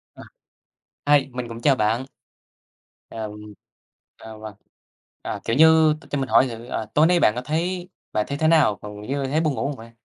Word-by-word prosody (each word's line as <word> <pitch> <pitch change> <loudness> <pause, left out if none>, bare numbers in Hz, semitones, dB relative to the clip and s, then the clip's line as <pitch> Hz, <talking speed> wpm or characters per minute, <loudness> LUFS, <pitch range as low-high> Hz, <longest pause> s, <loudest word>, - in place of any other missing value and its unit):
À. - - -12 0.9
Hi, 140 - -3
mình 125 -1 -4
cũng 115 0 -8
chào 140 +1 +4
bạn. 115 +3 0 1.1
Ờm, 110 -2 -6 0.8
à, 110 -1 -11
vâng. 110 -1 -9 0.7
À, - - -5
kiểu 115 - 0
như 160 +1 +6
t - - -17
cho 145 - -2
mình 135 -1 -3
hỏi 135 - +5
thử, 115 -1 -8
ờ, 115 -2 -4
tối 155 +2 +5
nay 175 0 +3
bạn 105 - +3
có 125 - -3
thấy 175 +6 -3 0.2
bạn 105 - 0
thấy 140 - -3
thế 155 - +1
nào, 155 -10 +4
còn 105 0 -9
như 135 +5 -3
thấy 150 +4 0
buồn 155 -3 0
ngủ - - -2
không 145 - -4
vậy? 115 -1 -13
130 Hz, 205 wpm, -23 LUFS, 110-155 Hz, 1.1 s, như